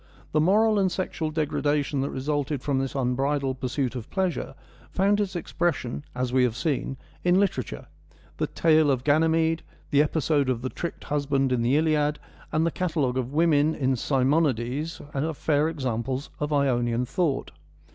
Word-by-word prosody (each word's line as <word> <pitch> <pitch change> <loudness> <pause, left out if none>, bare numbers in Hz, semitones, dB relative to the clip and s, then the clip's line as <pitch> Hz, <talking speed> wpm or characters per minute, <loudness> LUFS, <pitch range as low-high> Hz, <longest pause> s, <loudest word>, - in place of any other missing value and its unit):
The 155 - +3
moral 210 +5 +4
and 190 -2 +2
sexual 175 -3 -2
degradation 150 -2 0
that 140 - -1
resulted 145 0 -2
from 140 -3 0
this 135 0 -3
unbridled 135 +1 0
pursuit 130 0 -1
of 120 -3 -6
pleasure 190 -3 -2 0.3
found 200 +2 +2
its 195 -3 -1
expres 175 -1 0
sion, 125 +3 -6
as 125 -1 -2
we 130 -1 +4
have 120 -3 +1
seen, 135 -1 -2 0.3
in 180 +1 +4
literature. 130 - -1 0.5
The - - 0
tale 155 -2 +3
of 130 -3 +1
Ganymede, 160 +2 +2 0.3
the 145 -1 +5
episode 150 -2 +1
of 125 -2 -1
the 130 - -1
tricked 170 - -6
husband 140 -2 0
in 125 -2 +1
the 125 +5 +3
Iliad, 150 -1 +2 0.3
and 160 +1 +2
the 165 - +1
catalogue 155 -9 0
of 125 0 -3
women 155 0 +3
in 130 -1 +1
Simonides, 135 +2 0
are 155 +4 -1
fair 150 +2 +1
samples 130 +1 -2
of 150 0 -2
Ionian 125 -4 +1
thought. 145 +2 -1
145 Hz, 165 wpm, -26 LUFS, 130-160 Hz, 0.5 s, the